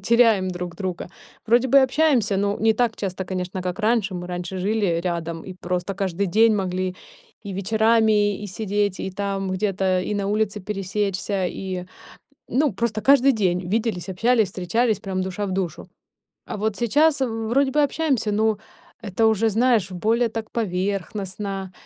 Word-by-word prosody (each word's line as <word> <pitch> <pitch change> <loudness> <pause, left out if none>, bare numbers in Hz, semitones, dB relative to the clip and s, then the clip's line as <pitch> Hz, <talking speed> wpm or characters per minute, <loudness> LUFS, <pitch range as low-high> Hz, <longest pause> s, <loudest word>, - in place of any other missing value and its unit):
теряем 225 -2 +4
друг 175 -1 -6
друга. 185 -4 -4 0.4
Вроде 240 +3 +3
бы 275 +2 +7
общаемся, 260 -7 +2
но 200 +1 0
не 220 +1 +4
так 230 -1 0
часто, 190 -1 -4
конечно, 185 0 -4
как 180 +3 -3
раньше. 215 -3 +1
Мы 175 0 -5
раньше 180 +1 -5
жили, 205 +3 0
э, 170 -2 +1
рядом 170 -2 -3
и 185 - -8
просто 180 +2 -2
каждый 195 0 -1
день 220 +4 +4
могли 185 -1 -2 0.5
и 200 - -6
вечерами, 215 +1 +2
и - - -4
сидеть, 205 0 -1
и 190 - -3
там 195 0 -3
где-то 190 -1 0
и 195 +3 -3
на 200 -1 -1
улице 210 -1 0
пересечься, 195 -1 -2
и 185 0 -4 0.7
ну 280 +3 +2
просто 220 +1 -1
каждый 275 +1 +5
день 180 -5 0
виделись, 210 -4 -1
общались, 225 +3 +2
встречались, 210 +4 0
прям 190 -2 -3
душа 190 +2 -3
в - - -4
душу. 180 -2 -3 0.6
А - - -5
вот 215 0 -1
сейчас 285 +6 +3
в 225 -3 -2
вроде 270 +3 +2
бы 300 - +3
общаемся, 280 -7 0
но 215 0 +1 0.4
это 215 +1 +1
уже, 220 0 +3
знаешь, 225 -3 +2
более 225 +6 +1
так 225 0 -6
поверхностно 195 -1 -3
205 Hz, 165 wpm, -23 LUFS, 185-225 Hz, 0.7 s, бы